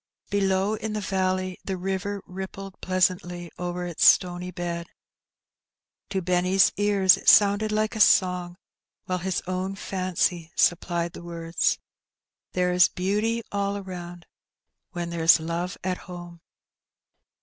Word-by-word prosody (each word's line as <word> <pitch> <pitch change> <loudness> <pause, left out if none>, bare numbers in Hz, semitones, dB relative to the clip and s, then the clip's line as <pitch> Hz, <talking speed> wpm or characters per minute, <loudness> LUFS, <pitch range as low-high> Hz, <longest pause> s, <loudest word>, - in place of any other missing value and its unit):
Below 195 0 +1
in 220 0 -4
the 215 - -2
valley 185 -1 -1
the 190 -1 -3
river 195 +2 -3
rippled 190 +1 -8
pleasantly 180 -2 0
over 180 0 -3
its 175 -2 -2
stony 180 0 +4
bed. 170 -1 -4 1.2
To 190 -2 -2
Benny's 185 +2 +3
ears 200 -2 +4
it - - +3
sounded 205 +1 +5
like 215 +1 0
a - - -4
song, 180 -3 +3 0.5
while 185 -1 -2
his 185 +1 -2
own 185 +1 -3
fancy 185 -3 -2
supplied 170 0 +1
the - - -9
words 170 -1 -1 0.2
— - - -67
*' - - -67
There 180 0 +1
is 180 0 +6
beauty 210 +5 -1
aU 200 0 -1
around 175 -3 -8 0.7
When 175 -1 -4
there's 165 0 +5
love 170 +3 -3
at 185 0 -2
home." 175 -2 -10
185 Hz, 135 wpm, -25 LUFS, 175-195 Hz, 1.2 s, is